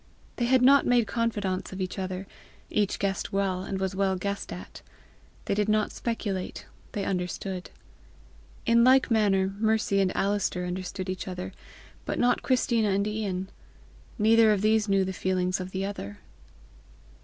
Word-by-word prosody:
They 240 - +1
had 255 +1 +4
not 275 +2 +7
made 245 -2 +4
confidantes 210 -6 -2
of 190 - -7
each 185 0 -3
other, 185 0 -4 0.5
each 205 -2 +1
guessed 195 -1 -2
well, 195 -2 0
and 190 0 -4
was 190 0 -2
well 190 -1 +1
guessed 200 +2 -4
at. 90 +1 -9 0.6
They - - 0
did 210 +1 0
not 215 0 +2
speculate; 205 -5 -4 0.3
they 200 -2 -2
understood. 180 0 -3 1.0
In 235 0 +5
like 260 0 +5
manner, 195 -3 +2
Mercy 220 -2 +2
and 190 -1 +2
Alister 195 -2 0
understood 185 +1 -4
each 185 0 -4
other, 185 0 -5 0.5
but - - -3
not 245 0 +2
Christina 235 -4 +2
and 200 +1 +1
Ian. 200 -3 -3 0.7
Neither 225 0 +5
of 205 -1 +1
these 215 -1 +3
knew 195 -1 +3
the 190 - -3
feelings 185 0 0
of 185 0 -5
the 190 +1 -3
other. 105 - -6
195 Hz, 155 wpm, -27 LUFS, 185-220 Hz, 1.0 s, not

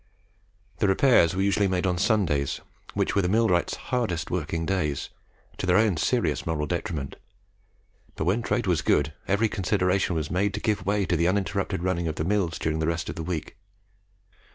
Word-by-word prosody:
The 100 - +3
repairs 95 -4 +4
were 95 - +1
usually 100 0 +2
made 90 0 0
on 90 -1 0
Sundays, 95 - +1 0.4
which - - 0
were 100 - +4
the 90 - 0
millwrights' 105 -4 +2
hardest 105 -11 -2
working 80 -1 -2
days, 80 -7 -1 0.5
to 95 - -2
their 90 0 +4
own 110 -4 +3
serious 80 - 0
moral 75 -2 -1
detriment; 80 -3 -4 1.0
but 80 - -3
when 100 +7 +2
trade 110 +1 -1
was 90 -5 +1
good, 75 +1 +2
every 105 +3 +2
consideration 95 -3 0
was 75 -2 -2
made 100 +2 0
to - - -3
give 105 -4 -1
way 100 -1 +2
to 85 - 0
the 85 +1 +2
uninterrupted 95 -2 -1
running 90 -2 0
of 80 - -2
the 80 - -2
mills 95 -4 0
during 80 0 -1
the 80 - 0
rest 85 0 -2
of - - -5
the - - -5
week. 80 +3 -4
90 Hz, 185 wpm, -26 LUFS, 80-100 Hz, 1.0 s, repairs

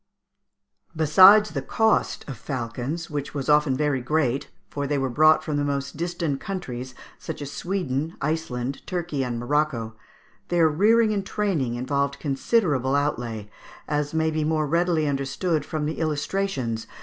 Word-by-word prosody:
] 65 - -43
Besides 190 +7 +7
the 140 -4 -3
cost 220 +10 +1
of 135 - -5
falcons, 130 +6 -4
which 145 0 -4
was 140 -2 -3
often 150 -3 +4
very 145 -3 0
great 135 -1 0 0.2
(for 145 -1 -4
they 145 0 0
were 135 -2 -1
brought 155 +4 +5
from 150 -2 -2
the 145 - 0
most 140 -1 -2
distant 170 -3 -2
countries, 130 -10 -5 0.2
such 160 - -6
as 145 -1 -6
Sweden, 165 -4 -2
Iceland, 135 -4 -2
Turkey, 170 -6 -2
and 120 -2 -3
Morocco), 120 -3 -1 0.5
their 170 -2 +3
rearing 215 +8 +3
and 200 -2 -1
training 185 - -1
involved 140 +3 -1
considerable 140 - +1
outlay, 120 -7 -2 0.4
as 150 -1 -1
may 160 0 +1
be 155 0 -1
more 155 0 +1
readily 170 +1 +1
understood 140 +4 -1
from 150 0 -3
the 155 - -3
illustrations 150 -6 -2
(Figs. - - -24
150 Hz, 155 wpm, -24 LUFS, 135-165 Hz, 0.5 s, Besides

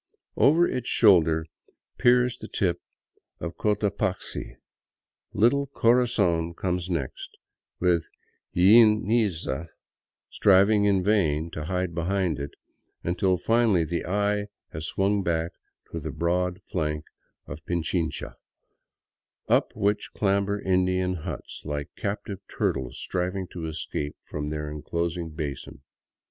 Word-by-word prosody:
Over 165 +5 +5
its 125 -2 -3
shoulder 80 -7 +5 0.5
peers 125 0 +4
the 110 - -8
tip 90 -6 -1 0.6
of 85 -1 -5
Cotapaxi; 105 -2 -1 0.8
little 140 +6 +3
Corazon 110 -10 +2
comes 90 0 -2
next, 80 -7 -4 0.4
with 85 -2 +1 0.5
Iliniza 105 - +4 0.6
striving 100 +1 +4
in 100 -2 +3
vain 85 -6 +1
to 75 -2 -5
hide 90 0 -2
behind 85 -2 0
it, 70 +1 -4 0.5
until 90 +2 +1
finally 110 -2 +3
the 85 +2 -2
eye 105 +2 0 0.3
has 80 +1 -3
swung 100 +1 +1
back 85 -2 -1 0.4
to - - -4
the - - -5
broad 90 +3 -1
flanks 75 -2 -3 0.3
of 80 - -9
Pichincha, 85 -1 -2 1.1
up - - +3
which 105 +1 0
clamber 100 0 +1
Indian 95 -1 +1
huts, 85 -4 -6
like 75 -1 -5
captive 100 -1 -4
turtles 65 -1 -2
striving 90 +1 -2
to 85 -3 -6
escape 75 -2 -4
from 75 0 -5
their 75 0 -3
enclosing 85 +2 -3
basin. 75 -3 -6
90 Hz, 110 wpm, -26 LUFS, 80-105 Hz, 1.1 s, Over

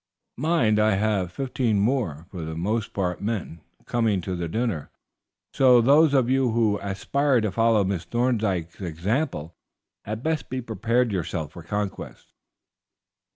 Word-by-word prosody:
Mind, 130 -9 +2
I 105 -1 +3
have 100 -3 0
fifteen 125 -2 0
more, 100 - 0
for 90 - -6
the 80 0 -5
most 105 +6 -1
part 90 -3 -2
men, 100 -6 -3 0.2
coming 115 -5 +1
to 85 -1 -3
dinner, 110 - -2 0.6
so 125 -2 +6
those 140 +5 +5
of 130 -3 +3
you 130 0 +2
who 110 -3 +2
aspire 130 +7 +1
to 110 -2 -1
follow 115 +1 +3
Miss 95 -3 -2
Thorndyke's 105 -9 -1
example 85 - -2 0.5
had 110 +3 -5
best 160 -1 -1
prepare 120 -1 0
yourselves 85 - -3
for 85 - -9
conquest." 105 +3 -5
110 Hz, 135 wpm, -25 LUFS, 90-125 Hz, 0.6 s, so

